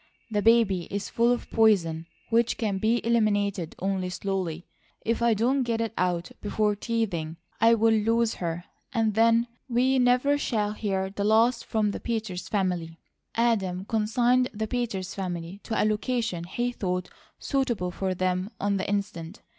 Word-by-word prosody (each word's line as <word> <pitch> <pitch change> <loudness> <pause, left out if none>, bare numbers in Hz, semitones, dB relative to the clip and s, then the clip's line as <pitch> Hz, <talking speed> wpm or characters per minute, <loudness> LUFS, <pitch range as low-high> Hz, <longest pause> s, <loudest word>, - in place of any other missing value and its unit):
"The 210 -1 +1
baby 220 -5 +3
is 200 0 -3
full 235 +1 +3
of 245 - -2
poison 170 -8 +3 0.2
which 230 0 +2
can 205 -4 -1
be 225 +3 +1
eliminated 205 -6 +1
only 190 -1 -1
slowly. 180 -2 -3 0.4
If 230 +1 0
I 235 -1 +4
don't 250 +6 +2
get 235 -2 -1
it 225 -1 -2
out 175 -2 -1
before 210 0 0
teething, 195 -8 -2 0.2
I'll 230 +1 +6
lose 225 +1 +3
her, 170 0 -3 0.3
and 225 -4 +1
then 230 +2 +4 0.2
we 255 +2 +3
never 250 +4 +3
shall 210 -7 0
hear 195 -3 -2
the 200 +1 -3
last 230 +3 +3
from 215 -2 0
the - - -5
Peters 215 -6 -3
family." 180 -5 -1 0.4
Adam 195 -6 +1
consigned 240 +4 +2
the 220 +1 -1
Peters 215 -6 -3
family 180 -1 -5
to 220 - -1
a - - +3
location 215 -4 -1
he 240 +7 -2
thought 180 -5 -2 0.3
suitable 240 -10 -1
for 190 +1 -2
them 185 +1 -1
on 200 0 +1
the 190 - -3
instant. 200 -2 -3
210 Hz, 155 wpm, -27 LUFS, 185-230 Hz, 0.4 s, I'll